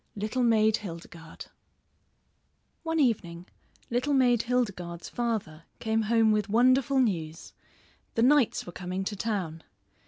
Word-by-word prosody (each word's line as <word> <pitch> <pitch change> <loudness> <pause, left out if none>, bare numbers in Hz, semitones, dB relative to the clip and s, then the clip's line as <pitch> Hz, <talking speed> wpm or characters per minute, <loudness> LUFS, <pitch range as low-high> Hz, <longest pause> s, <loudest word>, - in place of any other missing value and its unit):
LITTLE 215 +5 -2
MAID 220 -2 +3
HILDEGARDE 165 -3 -10 1.4
One 325 -1 -2
evening 180 - 0 0.5
Little 255 +4 +1
Maid 245 -3 +3
Hildegarde's 195 -9 -3
father 215 -10 -3
came 220 0 0
home 225 0 +3
with 210 -1 0
wonderful 255 +4 +3
news; 165 -10 -2 0.6
the 230 - +2
knights 275 -2 +3
were 175 - -8
coming 180 +2 -4
to 205 +2 -4
town. 190 -7 -3
220 Hz, 120 wpm, -28 LUFS, 180-245 Hz, 1.4 s, MAID